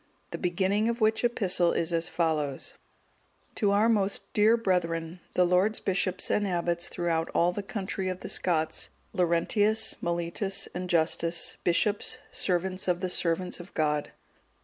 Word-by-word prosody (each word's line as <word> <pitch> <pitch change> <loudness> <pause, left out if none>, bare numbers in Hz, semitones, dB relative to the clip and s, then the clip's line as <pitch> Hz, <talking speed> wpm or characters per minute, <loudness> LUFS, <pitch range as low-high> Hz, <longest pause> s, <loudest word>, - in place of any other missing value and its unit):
The - - -5
beginning 195 +5 +1
of 235 +1 -2
which 220 +1 +2
epistle 190 -7 +2
is 170 +1 0
as 165 0 0
follows: 155 -5 -1 0.8
"_To 205 -3 +2
our 205 +3 +4
most 205 -3 0
dear 215 +2 +5
brethren, 170 -5 -1 0.2
the 180 - +5
Lords 185 +5 +2
Bishops 185 -1 -1
and 205 -1 +1
Abbots 175 -1 -1
throughout 165 -2 -1
all 175 +1 +4
the 205 - -4
country 195 -1 -3
of 185 0 -5
the - - -6
Scots,_(184)_ 160 -3 0 0.3
Laurentius, 205 +6 +2
Mellitus, 170 +3 -2
and 180 +1 -4
Justus, 170 0 +1
Bishops, 205 +7 +1
servants 185 +1 -1
of 180 -1 +1
the 185 -2 -1
servants 180 +1 -1
of 175 +3 -12
God. 150 -1 0
180 Hz, 150 wpm, -28 LUFS, 170-200 Hz, 0.8 s, dear